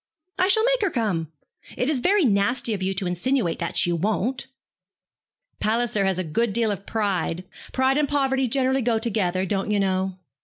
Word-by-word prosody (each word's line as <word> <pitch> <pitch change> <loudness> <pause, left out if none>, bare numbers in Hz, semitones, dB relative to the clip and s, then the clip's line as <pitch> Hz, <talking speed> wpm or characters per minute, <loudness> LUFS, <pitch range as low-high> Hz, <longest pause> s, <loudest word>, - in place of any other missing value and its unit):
'I 370 - +4
shall 440 +3 +3
make - - +2
her 400 - +2
come. 195 - -1 0.5
It 250 - 0
is 295 -3 +1
very 375 +4 +3
nasty 220 +2 +2
of 195 - -4
you 190 +1 0
to 190 - -1
insinuate 180 +2 0
that 170 - -2
she 175 - +3
won't.' 215 +9 -1 1.1
'Palliser 215 -2 +1
has 190 -2 +1
a 185 - -1
good 200 +7 -1
deal 225 -1 +1
of 195 0 -6
pride 190 -5 -1 0.3
pride 265 +2 +2
and 295 -2 0
poverty 270 -2 +1
generally 265 +2 +1
go 235 -1 +1
together, 195 -5 0
don't 195 +2 -2
you 210 -1 +1
know. 190 -1 0
220 Hz, 185 wpm, -24 LUFS, 190-265 Hz, 1.1 s, I